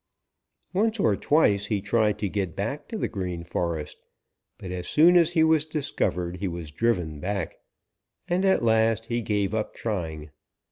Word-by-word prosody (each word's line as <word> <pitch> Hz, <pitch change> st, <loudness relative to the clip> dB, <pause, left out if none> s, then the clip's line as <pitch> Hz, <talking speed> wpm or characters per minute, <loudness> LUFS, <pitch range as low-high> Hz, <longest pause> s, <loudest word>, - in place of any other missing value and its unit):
"Once 220 Hz, +3 st, +1 dB
or 110 Hz, -, +3 dB
twice 105 Hz, -7 st, +2 dB
he 105 Hz, -1 st, 0 dB
tried 105 Hz, +1 st, +1 dB
to 105 Hz, -, -2 dB
get 95 Hz, -4 st, -3 dB
back 115 Hz, +9 st, -3 dB
to 225 Hz, -, -5 dB
the -, -, -1 dB
Green 90 Hz, -3 st, -4 dB
Forest, 85 Hz, -3 st, -3 dB, 0.6 s
but 90 Hz, -, -7 dB
as 90 Hz, -1 st, -4 dB
soon 170 Hz, +4 st, +5 dB
as 170 Hz, -1 st, +4 dB
he 160 Hz, -2 st, +4 dB
was 160 Hz, -2 st, +4 dB
discovered 90 Hz, -, -2 dB
he 100 Hz, +2 st, -2 dB
was 85 Hz, -3 st, -6 dB
driven 90 Hz, -7 st, 0 dB
back, 95 Hz, +1 st, -3 dB, 0.7 s
and 180 Hz, +2 st, +1 dB
at 190 Hz, -9 st, +3 dB
last 110 Hz, 0 st, +2 dB
he 120 Hz, +1 st, -1 dB
gave 105 Hz, -2 st, -1 dB
up 110 Hz, -1 st, -2 dB
trying. 80 Hz, -8 st, -4 dB
105 Hz, 170 wpm, -26 LUFS, 90-145 Hz, 0.7 s, soon